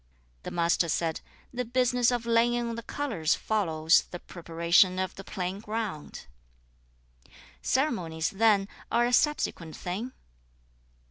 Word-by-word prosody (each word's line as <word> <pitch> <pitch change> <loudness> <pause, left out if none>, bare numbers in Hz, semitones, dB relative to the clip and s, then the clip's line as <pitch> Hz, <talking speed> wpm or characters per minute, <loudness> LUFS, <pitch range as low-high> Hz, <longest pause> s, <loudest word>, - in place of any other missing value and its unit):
"' - - -37
2. - - -3
The - - -9
Master 170 0 +2
said, 165 0 -1 0.3
'The 250 0 -2
business 245 0 +2
of 240 -2 -1
laying 235 +1 +2
on - - -3
the 230 - -5
colours 220 - -1
follows 165 -7 +2
(the 175 - -6
preparation 170 +2 +2
of) 185 0 -2
the 195 - -10
plain 190 -1 -4
ground.' 215 -7 -5 1.0
3. - - -25 0.3
'Ceremonies 180 - 0
then 205 -1 +3 0.2
are 240 0 +3
a 245 - -1
subsequent 210 - +1
thing?' 200 +8 -4
195 Hz, 140 wpm, -28 LUFS, 170-235 Hz, 1.0 s, then